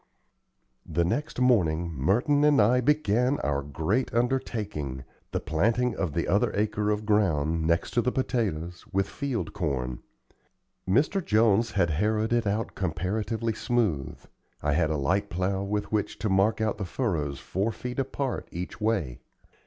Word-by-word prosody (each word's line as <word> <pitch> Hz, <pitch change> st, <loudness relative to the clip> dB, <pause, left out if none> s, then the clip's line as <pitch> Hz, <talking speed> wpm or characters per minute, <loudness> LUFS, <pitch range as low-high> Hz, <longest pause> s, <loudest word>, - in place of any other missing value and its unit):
The 85 Hz, -, 0 dB
next 145 Hz, -, -2 dB
morning 85 Hz, -10 st, +2 dB
Merton 120 Hz, -, +2 dB
and 150 Hz, -1 st, +5 dB
I 120 Hz, +4 st, +4 dB
began 125 Hz, -1 st, +2 dB
our 70 Hz, -1 st, 0 dB
great 80 Hz, -, -1 dB
undertaking 105 Hz, -, -1 dB, 0.3 s
the -, -, -2 dB
planting 115 Hz, +9 st, +1 dB
of 90 Hz, -7 st, -2 dB
the 85 Hz, -, 0 dB
other 100 Hz, +3 st, +2 dB
acre 105 Hz, 0 st, 0 dB
of 105 Hz, 0 st, -1 dB
ground, 80 Hz, -7 st, +1 dB
next 85 Hz, 0 st, +1 dB
to 120 Hz, -, +2 dB
the 125 Hz, +2 st, 0 dB
potatoes, 90 Hz, -10 st, -2 dB
with 95 Hz, 0 st, +1 dB
field 140 Hz, -1 st, -3 dB
corn. 65 Hz, -, -2 dB, 0.9 s
Mr. 150 Hz, -, +2 dB
Jones 110 Hz, 0 st, +3 dB
had 85 Hz, -4 st, +2 dB
harrowed 110 Hz, +7 st, +1 dB
it 120 Hz, -2 st, +2 dB, 0.3 s
comparatively 105 Hz, +6 st, -2 dB
smooth, 105 Hz, -, -1 dB, 0.5 s
I 75 Hz, 0 st, +2 dB
had 80 Hz, 0 st, +2 dB
a 80 Hz, -, 0 dB
light 95 Hz, +9 st, 0 dB
plow 95 Hz, +2 st, -1 dB
with 100 Hz, +1 st, -2 dB
which 105 Hz, -2 st, -1 dB
to 110 Hz, -, -2 dB
mark 100 Hz, +4 st, +3 dB
out 110 Hz, -1 st, 0 dB
the 100 Hz, -, -2 dB
furrows 85 Hz, -, -2 dB
four 100 Hz, +5 st, -1 dB
feet 125 Hz, +3 st, -5 dB
apart 135 Hz, 0 st, -2 dB
each 90 Hz, +5 st, -6 dB
way. 100 Hz, -, 0 dB
105 Hz, 150 wpm, -27 LUFS, 85-120 Hz, 0.9 s, and